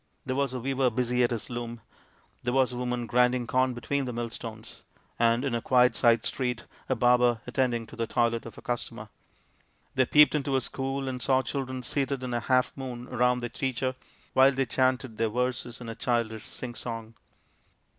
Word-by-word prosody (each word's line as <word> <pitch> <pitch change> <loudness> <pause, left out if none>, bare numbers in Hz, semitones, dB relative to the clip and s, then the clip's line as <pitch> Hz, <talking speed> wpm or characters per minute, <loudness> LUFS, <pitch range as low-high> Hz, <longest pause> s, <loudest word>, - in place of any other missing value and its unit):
There 130 -1 -2
was 140 -1 +1
a 130 - -3
weaver 135 +1 +1
busy 125 +1 0
at 120 - +3
his 115 -4 -3
loom, 120 -1 -5 0.6
there 125 +1 -1
a 135 -1 +5
woman 125 -1 -2
grinding 125 +2 +2
corn 130 +1 +1
between 135 +4 -1
the 125 - -3
millstones, 115 -1 -6 0.4
and 115 +2 +3
in 135 - -1
a 120 - 0
quiet 125 0 +4
side 115 -2 +3
street 125 -3 -2 0.2
a 130 - +2
barber 120 -1 +4
attending 125 -2 0
to - - -12
the 115 0 -2
toilet 115 -1 0
of 115 - -11
a - - -11
customer. 120 -1 -4 0.8
They 130 -1 +2
peeped 150 0 +6
into 140 -2 0
a 130 - +3
school 135 +2 -3
and 130 -1 -3
saw 130 0 +3
the - - -6
children 130 -2 -3
seated 135 +1 -1
in 125 -1 -3
a 120 - +1
half 125 +2 +1
moon 125 -3 -6
round 125 0 +2
their 120 - -3
teacher 130 +1 -2 0.4
while 135 +1 +6
they 135 0 0
chanted 130 -1 0
their 115 -1 +1
verses 125 +1 -2
in 120 - -8
a 115 - -4
childish 115 -2 -1
sing 125 -2 -6
song. 115 -2 -6
125 Hz, 195 wpm, -28 LUFS, 120-130 Hz, 0.8 s, peeped